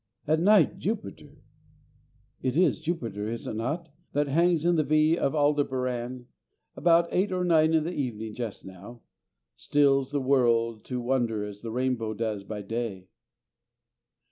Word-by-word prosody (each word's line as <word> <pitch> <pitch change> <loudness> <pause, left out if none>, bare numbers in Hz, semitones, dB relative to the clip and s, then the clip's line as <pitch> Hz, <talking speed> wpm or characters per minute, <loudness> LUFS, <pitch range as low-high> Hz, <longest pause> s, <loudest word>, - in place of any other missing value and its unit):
At 155 +1 +3
night, 195 -1 +4
Jupiter 185 -8 -5 1.0
it 130 +2 -1
is 180 - +3
Jupiter, 115 - -3
is 115 0 -5
it - - -4
not? 145 +10 -3 0.2
that 145 0 +1
hangs 165 +2 +2
in 175 0 +3
the 155 - +2
V 155 +2 +3
of 145 -3 -1
Aldebaran 130 -4 0 0.5
about 170 0 +4
eight 190 +3 +1
or 180 -1 -1
nine 160 -2 +4
in 160 - +3
the 170 +3 -3
evening 110 -7 -4
just 115 -2 -6
now 95 +6 -11 0.5
stills 135 -2 +2
the 145 - 0
world 115 -4 +2
to 125 -1 -3
wonder 120 -4 0
as 105 0 -9
the 115 - -6
rainbow 120 -2 -1
does 110 -2 -3
by 105 0 -6
day. 100 -4 -4
130 Hz, 150 wpm, -27 LUFS, 115-155 Hz, 1.0 s, night